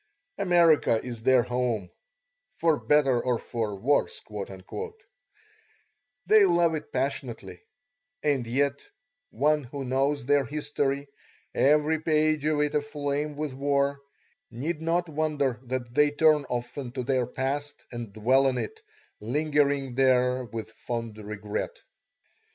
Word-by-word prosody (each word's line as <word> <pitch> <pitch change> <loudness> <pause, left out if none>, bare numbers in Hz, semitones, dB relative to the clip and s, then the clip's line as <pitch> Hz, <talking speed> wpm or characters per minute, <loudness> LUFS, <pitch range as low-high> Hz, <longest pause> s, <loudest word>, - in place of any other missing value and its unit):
America 170 - +4
is 120 -3 -6
their 125 +1 +4
home, 120 -6 -1 0.7
"for 160 -3 +2
better 135 -5 +3
or 125 -2 +1
for 110 -3 -3
worse"; 135 +9 +1 2.1
they 215 -1 +6
love 170 -3 +4
it 155 -1 -5
passionately; 125 -9 -3 0.6
and 140 -5 +1
yet 140 +3 0 0.5
one 150 +1 +1
who 135 +2 -6
knows 135 +1 0
their 145 +1 +3
history, 145 0 -2 0.5
every 150 +2 +3
page 155 -1 +2
of 155 -1 +2
it 150 0 0
aflame 145 0 -2
with 150 -2 -3
war, 140 +1 0 0.5
need 155 +6 -4
not 170 +2 0
wonder 150 -5 -1
that 120 -1 -4
they 150 +3 +4
turn 150 0 +3
often 120 +1 -4
to 125 - -3
their 130 -1 +1
past 140 +3 -3
and 120 -3 -6
dwell 130 +6 +3
on 130 -1 0
it, 440 - -5 0.4
lingering 140 +1 +1
there 125 -1 +3
with 115 -1 -7
fond 115 -2 -5
regret. 105 0 -4
140 Hz, 120 wpm, -27 LUFS, 125-150 Hz, 2.1 s, they